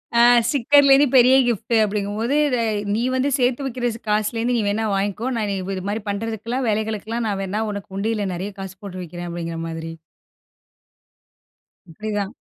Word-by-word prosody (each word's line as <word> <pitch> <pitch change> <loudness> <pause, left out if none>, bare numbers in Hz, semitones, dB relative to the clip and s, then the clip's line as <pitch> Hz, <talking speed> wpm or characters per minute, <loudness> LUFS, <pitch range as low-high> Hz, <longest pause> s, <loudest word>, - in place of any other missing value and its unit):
ஆ - - +5 0.3
sticker 285 +1 +4
லேந்து 275 +2 +7
பெரிய 255 +1 +7
gift 230 0 -1
அப்படிங்கும்போது 210 +5 -2 0.2
த 250 - +1 0.4
நீ 225 - 0
வந்து 260 +2 +1
சேத்து 255 +2 +1
வைக்கிற 250 -2 -1 0.2
காசுலேந்து 225 +3 0
நீ 225 - +1
வேணா 220 +2 -1
வாங்கிக்கோ. 200 +4 -2
நான் 210 -2 -1 0.2
இது 185 0 -6
மாதிரி 210 +1 -3
பண்ணுறதுக்கெல்லாம் 225 +4 -3
வேலைகளுக்கெலாம் 220 +2 -2
நான் 200 -1 -2
வேணா 205 +3 -2
உனக்கு 200 -2 -7
உண்டியில 210 -1 -1
நிறைய 185 +4 -4
காசு 190 -1 -7
போட்டு 185 -2 -7
வைக்கிறேன். 175 +1 -7
அப்படிங்கிற 170 -1 -5
மாதிரி. 165 0 -6 2.0
அப்படிதான். 205 +4 -4
215 Hz, 150 wpm, -22 LUFS, 195-235 Hz, 2.0 s, லேந்து